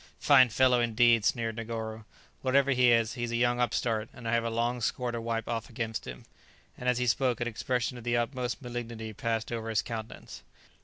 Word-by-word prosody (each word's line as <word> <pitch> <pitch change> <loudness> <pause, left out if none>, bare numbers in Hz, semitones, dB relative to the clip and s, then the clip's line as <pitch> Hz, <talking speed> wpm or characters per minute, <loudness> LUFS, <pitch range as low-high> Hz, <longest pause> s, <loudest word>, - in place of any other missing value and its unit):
"Fine 130 -1 +6
fellow, 125 +2 +3
indeed!" 120 -1 +4
sneered 115 -2 0
Negoro; 110 -1 -5 0.4
"whatever 140 +1 +3
he 125 -2 +4
is, 115 -1 +3
he 125 - -6
is 120 -1 -2
a - - -1
young 120 +1 +2
upstart, 115 -2 0
and 120 -2 -9
I 115 - 0
have 115 0 +2
a 115 - -1
long 120 +2 -1
score 125 +2 -1
to 120 -1 -4
wipe 115 -1 -3
off 115 -1 -3
against 115 -2 -4
him;" 60 -1 -8 0.5
and, 125 - -2
as 125 - +2
he 125 - 0
spoke, 125 0 +1
an 120 - -1
expression 120 +1 -2
of - - -12
the 120 0 +1
utmost 120 -1 -2
malignity 115 -2 -6
passed 115 +1 -2
over 115 -1 -3
his 110 -3 +1
countenance. 115 -2 -7
120 Hz, 210 wpm, -29 LUFS, 115-125 Hz, 0.5 s, Fine